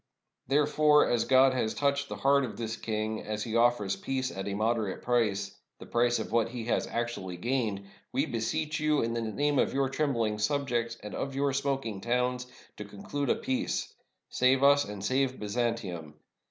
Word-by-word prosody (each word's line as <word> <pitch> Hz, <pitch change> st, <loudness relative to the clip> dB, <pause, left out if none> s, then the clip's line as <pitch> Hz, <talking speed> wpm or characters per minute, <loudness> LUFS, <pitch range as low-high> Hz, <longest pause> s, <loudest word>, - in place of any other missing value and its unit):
Therefore, 150 Hz, +2 st, +4 dB
as 120 Hz, -2 st, +1 dB
God 130 Hz, 0 st, +5 dB
has 115 Hz, -4 st, -1 dB
touched 140 Hz, 0 st, 0 dB
the -, -, -4 dB
heart 140 Hz, +1 st, +3 dB
of 120 Hz, -, -5 dB
this 115 Hz, -1 st, -3 dB
king, 110 Hz, -1 st, -3 dB
as 105 Hz, 0 st, -4 dB
he 115 Hz, -1 st, -4 dB
offers 115 Hz, -4 st, +3 dB
peace 130 Hz, -1 st, -2 dB
at 95 Hz, +1 st, -5 dB
a 100 Hz, -, -2 dB
moderate 110 Hz, -1 st, -1 dB
price 100 Hz, -5 st, 0 dB
— -, -, -57 dB
the -, -, -10 dB
price 120 Hz, 0 st, +2 dB
of 110 Hz, -, -5 dB
what 115 Hz, -1 st, +2 dB
he 120 Hz, -2 st, -6 dB
has 120 Hz, -, 0 dB
actually 115 Hz, -7 st, -3 dB
gained 115 Hz, -2 st, -1 dB
— -, -, -33 dB
we -, -, +1 dB
beseech 150 Hz, +7 st, -2 dB
you, 150 Hz, -2 st, +2 dB
in 115 Hz, 0 st, -1 dB
the 115 Hz, -, -1 dB
name 140 Hz, +6 st, 0 dB
of -, -, +1 dB
your 135 Hz, -1 st, +1 dB
trem 145 Hz, +1 st, 0 dB
bling 110 Hz, -3 st, -1 dB
subjects, 120 Hz, -1 st, 0 dB
and 105 Hz, -, -7 dB
of 135 Hz, -1 st, -4 dB
your 140 Hz, 0 st, +1 dB
smoking 135 Hz, -7 st, -2 dB
towns, 125 Hz, +2 st, 0 dB, 0.3 s
to 105 Hz, -, -5 dB
conclude 105 Hz, +7 st, -4 dB
a -, -, +4 dB
peace! 130 Hz, -, -2 dB, 0.3 s
Save 130 Hz, +1 st, +2 dB
us 145 Hz, +1 st, +6 dB
and 100 Hz, -1 st, -6 dB
save 130 Hz, +2 st, +1 dB
Byzantium! 105 Hz, -8 st, -3 dB
120 Hz, 195 wpm, -29 LUFS, 110-135 Hz, 0.3 s, us